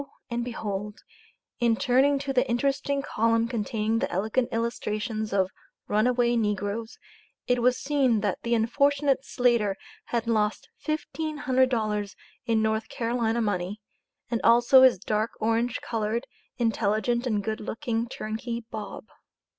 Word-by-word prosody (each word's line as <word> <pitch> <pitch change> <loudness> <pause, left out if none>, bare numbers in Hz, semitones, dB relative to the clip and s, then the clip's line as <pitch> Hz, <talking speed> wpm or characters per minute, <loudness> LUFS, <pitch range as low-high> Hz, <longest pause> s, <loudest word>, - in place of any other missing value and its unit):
and 235 0 -1
behold, 210 -3 -5 0.6
in 235 -1 +3
turning 265 +4 +3
to 275 0 -3
the 255 0 +2
interesting 275 +3 0
column 230 -1 +1
containing 225 -1 -1
the - - -1
elegant 220 +6 0
illustrations 220 -1 -2
of 190 -1 +1 0.4
"runaway 240 +3 +2
negroes," 210 +1 -2 0.5
it 245 -1 +1
was 250 +1 +3
seen 270 -6 +2
that 205 -3 -1
the 235 0 +1
unfortunate 275 +4 +2
Slater 235 -7 +1 0.3
had 235 -1 -1
"lost 215 -2 0
$1500 260 -9 0 0.3
in 225 -1 +2
North 220 0 0
Carolina 235 -1 0
money, 200 0 -2 0.5
and 235 - 0
also 240 +3 +6
his 260 -4 +7
dark 215 +4 -1
orange 230 +2 0
colored, 225 +1 -2 0.3
intelligent, 230 +1 +1
and 210 -4 0
good 220 0 -2
looking 225 +1 -2
turnkey, 230 +1 -4
Bob." 215 -2 -6
230 Hz, 125 wpm, -27 LUFS, 215-245 Hz, 0.6 s, his